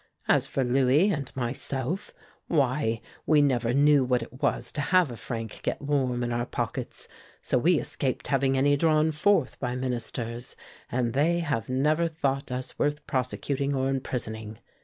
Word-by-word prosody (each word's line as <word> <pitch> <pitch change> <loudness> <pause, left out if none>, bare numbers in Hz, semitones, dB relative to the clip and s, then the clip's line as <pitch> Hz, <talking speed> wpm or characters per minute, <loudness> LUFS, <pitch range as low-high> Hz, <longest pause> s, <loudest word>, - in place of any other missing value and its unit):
As - - +3
for 135 - -1
Louis 135 +9 +3
and 140 -7 -3
myself, 135 - -3 0.4
why, 130 -6 +1 0.3
we 155 -1 +5
never 125 -5 +2
knew 145 +1 +5
what 125 -2 +1
it 130 +3 -13
was - - 0
to 150 - -2
have 180 -1 +3
a - - -6
franc 115 -1 -6
get - - -2
warm 130 -4 0
in 120 - -2
our 120 +1 -1
pockets, - - -4 0.3
so 125 - +1
we 165 +4 +4
escaped 130 -2 -2
having 135 -1 +2
any 145 +2 +4
drawn 155 +1 +3
forth 160 0 +2
by 125 -2 -2
Ministers, 120 -1 -4 0.4
and 120 -2 0
they 165 +5 +2
have 140 -10 -2
never 150 +6 +2
thought 140 -5 -2
us 125 0 -5
worth 145 0 0
prosecuting 140 +2 -1
or 130 0 0
imprisoning. 110 -5 -4
135 Hz, 160 wpm, -27 LUFS, 125-145 Hz, 0.4 s, we